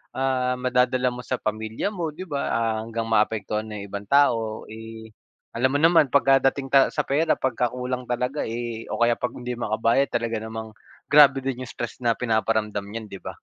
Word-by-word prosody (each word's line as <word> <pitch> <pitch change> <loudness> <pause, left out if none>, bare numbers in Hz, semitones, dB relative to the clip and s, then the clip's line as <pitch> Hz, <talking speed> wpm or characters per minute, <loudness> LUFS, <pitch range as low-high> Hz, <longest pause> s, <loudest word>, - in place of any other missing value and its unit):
ah, 130 -1 0
madadala 125 0 +2
mo 125 - -6
sa 130 - -1
pamilya 110 - -3
mo 165 -5 -3
di 185 - -7
ba, 140 -2 -2
ah, 115 -1 0
hanggang 115 0 -4
maapektuhan 110 0 0
ng 105 -1 -6
ibang 100 +1 -6
tao, 115 -6 +2
eh, 110 0 -10 0.4
alam 130 +3 +2
mo 145 - +2
naman 165 -5 +5
pagkadating 135 0 +3
ta 135 -1 +6
sa - - -1
pera 155 +4 +2
pagkakulang 125 0 -2
talaga, 125 +4 -1
eh, 115 0 -4
o - - -3
kaya 120 0 +4
pag 125 - -2
hindi 125 0 -5
makabayad 115 +4 +1
talaga 115 -1 -1
namang 110 0 -7 0.3
grabe 140 -2 +7
din 130 -1 -3
'yung 125 - -8
stress 120 +1 -6
na 115 -1 +2
pinaparamdam 110 -3 0
niyan, 110 +1 -7
di 95 - -8
ba? - - -5
120 Hz, 185 wpm, -24 LUFS, 110-130 Hz, 0.4 s, grabe